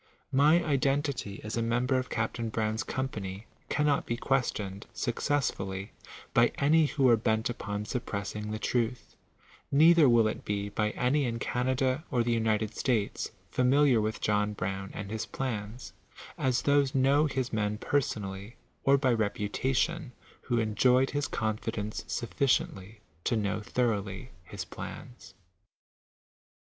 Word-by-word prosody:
My 150 +6 +5
identity 140 -6 0
as 105 - -4
a 115 - 0
mem 115 +2 +1
ber 130 0 +2
of 130 - -5
Capt. 115 -1 -2
Brown 110 -1 0
1 - - -4
i - - -2
company 105 -6 -4 0.2
cannot 150 -1 +1
be 120 - -1
questioned, 105 -7 -1
successfully, 110 -7 -1 0.4
by 120 0 +5
any 155 +2 +4
who 140 -2 +2
are 120 - +7
bent 110 +1 0
upon 105 -2 -4
suppressing 105 -3 -4
the 110 - -3
truth; 115 -1 -2 0.6
neither 155 0 +6
will 115 -2 +5
it 110 - -4
be 100 0 -2
by 105 +1 0
any 135 +3 +2
in 115 -1 -2
Canada 130 +4 0
or 120 -3 +1
the 120 - 0
United 110 -2 0
States 115 -6 0 0.2
familiar 130 -1 +4
with 110 +1 -2
John 105 0 +1
Brown 95 0 -4
and 100 0 -6
his 110 0 -3
plans, 115 -2 -5 0.4
as 130 -1 0
those 140 -1 +3
know 140 +3 +4
his 130 -4 -2
men 105 -1 0
personally, 105 -5 -2 0.3
or 140 0 +5
by 130 -3 +2
reputation, 120 +7 -1 0.3
who 120 -3 -1
enjoyed 125 +4 +3
his 145 -2 -1
oonfi 110 -3 -2
* 115 - -5
denoe 105 +1 -4
sufficiently 110 -4 -1 0.2
to - - +1
know 105 0 -1
thoroughly 110 0 -2
his - - -6
plans. 125 - -9
120 Hz, 145 wpm, -29 LUFS, 105-135 Hz, 0.6 s, are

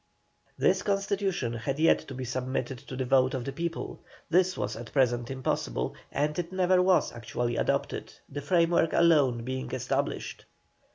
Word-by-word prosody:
This - - +3
constitution 195 - 0
had 120 +4 -3
yet 160 +2 +5
to 135 - -9
be 130 0 -4
submitted 130 +1 -3
to 130 - -9
the 130 0 -2
vote 130 +1 +3
of 125 -2 -4
the 135 - -3
people; 165 +4 -4 0.3
this 185 +1 +3
was - - -2
at 115 0 -8
present 120 -3 +2
impossible, 65 - -2 0.2
and 150 +3 0
it 170 0 -3
never 185 -1 +3
was 185 -1 +3
actually 120 +1 -3
adopted, - - -1 0.2
the 145 +1 -6
framework 165 +1 +2
alone 145 -8 +4
being 130 +1 -4
established. 135 +2 -2
135 Hz, 160 wpm, -28 LUFS, 125-170 Hz, 0.3 s, yet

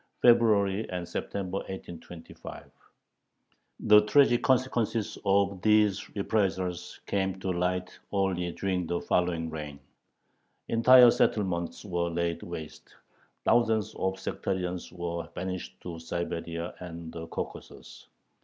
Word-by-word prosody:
(February 110 -3 +4
and 90 -1 -4
September, 95 +1 -3
1825). 90 -3 -9 1.1
The 105 0 +7
tragic 120 +3 +4
consequences 120 -4 +1
of 100 -1 +2
these 105 -1 +3
reprisals 95 -4 -1
came 95 -1 -1
to 95 0 -2
light 90 +1 -2
only 95 -3 0
during 90 -1 -2
the 85 +1 -1
following 85 -2 0
reign. 75 -2 -6 0.9
Entire 125 +1 +8
settlements 95 -5 0
were 85 -3 -1
laid 85 0 -1
waste, 80 -3 -9 0.5
thousands 110 -2 +2
of 95 0 -2
sectarians 90 -1 -3
were 85 -1 -4
banished 90 0 -5
to 85 -2 -7
Siberia 85 0 -4
and 85 -2 -8
the 80 0 -6
Caucasus. - - -8
95 Hz, 105 wpm, -29 LUFS, 85-105 Hz, 1.1 s, Entire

